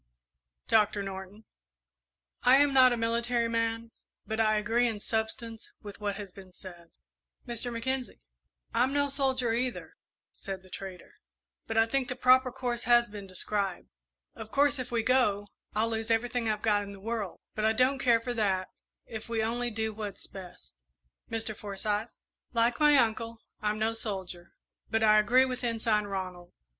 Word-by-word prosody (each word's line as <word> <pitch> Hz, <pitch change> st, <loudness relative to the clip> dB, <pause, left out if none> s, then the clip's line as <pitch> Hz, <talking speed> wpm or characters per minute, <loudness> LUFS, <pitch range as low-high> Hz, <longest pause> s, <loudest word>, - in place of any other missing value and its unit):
"Doctor 210 Hz, -2 st, +3 dB
Norton?" 195 Hz, +2 st, -8 dB, 1.0 s
"I 250 Hz, +1 st, +6 dB
am 285 Hz, 0 st, +4 dB
not 255 Hz, -1 st, +7 dB
a 240 Hz, -, 0 dB
military 235 Hz, +1 st, +1 dB
man, 230 Hz, 0 st, -1 dB, 0.3 s
but 220 Hz, +1 st, -3 dB
I 215 Hz, -1 st, +3 dB
agree 225 Hz, +3 st, +2 dB
in 220 Hz, -3 st, -3 dB
substance 225 Hz, +1 st, -4 dB
with 205 Hz, 0 st, -10 dB
what 205 Hz, -1 st, -1 dB
has 200 Hz, -2 st, -7 dB
been 190 Hz, -2 st, -13 dB
said." 175 Hz, -2 st, -12 dB, 0.6 s
"Mr. 240 Hz, 0 st, -1 dB
Mackenzie?" 255 Hz, +2 st, -3 dB, 0.5 s
"I'm 260 Hz, +2 st, +2 dB
no 285 Hz, 0 st, +2 dB
soldier, 265 Hz, -4 st, +1 dB
either," 245 Hz, +1 st, -2 dB, 0.4 s
said 190 Hz, -1 st, -7 dB
the 185 Hz, -, -18 dB
trader, 190 Hz, -2 st, -9 dB, 0.5 s
"but 225 Hz, -, -2 dB
I 225 Hz, -, +6 dB
think 260 Hz, +2 st, -1 dB
the 250 Hz, -, -2 dB
proper 255 Hz, 0 st, +5 dB
course 245 Hz, -2 st, -3 dB
has 240 Hz, -1 st, +5 dB
been 205 Hz, -2 st, -8 dB
described. 190 Hz, 0 st, -2 dB, 0.4 s
Of 220 Hz, -, -9 dB
course, 285 Hz, 0 st, +3 dB
if 255 Hz, 0 st, -4 dB
we 230 Hz, -2 st, +1 dB
go, 210 Hz, -5 st, +2 dB, 0.3 s
I'll 220 Hz, +2 st, +1 dB
lose 225 Hz, 0 st, -3 dB
everything 230 Hz, 0 st, +1 dB
I've 210 Hz, -1 st, -1 dB
got 210 Hz, -2 st, +3 dB
in 200 Hz, 0 st, -7 dB
the 200 Hz, -, -11 dB
world; 215 Hz, -2 st, -4 dB
but 215 Hz, -, -3 dB
I 220 Hz, -, +4 dB
don't 255 Hz, +4 st, +2 dB
care 235 Hz, -2 st, +4 dB
for 245 Hz, +2 st, -4 dB
that, 195 Hz, -5 st, 0 dB, 0.4 s
if 220 Hz, 0 st, -8 dB
we 225 Hz, -1 st, 0 dB
only 240 Hz, +2 st, -1 dB
do 220 Hz, -1 st, -2 dB
what's 210 Hz, -2 st, -6 dB
best." 185 Hz, -, -12 dB, 0.5 s
"Mr. 225 Hz, -1 st, -1 dB
Forsyth?" 210 Hz, +2 st, -3 dB, 0.4 s
"Like 235 Hz, 0 st, +2 dB
my 295 Hz, -1 st, +6 dB
uncle, 230 Hz, -1 st, +1 dB, 0.2 s
I'm 210 Hz, 0 st, 0 dB
no 220 Hz, +1 st, 0 dB
soldier, 190 Hz, -6 st, -6 dB, 0.4 s
but 225 Hz, 0 st, +1 dB
I 215 Hz, -1 st, +6 dB
agree 250 Hz, +5 st, +5 dB
with 255 Hz, -1 st, -4 dB
Ensign 225 Hz, -3 st, +1 dB
Ronald. 185 Hz, -3 st, -5 dB
225 Hz, 170 wpm, -29 LUFS, 205-240 Hz, 1.0 s, not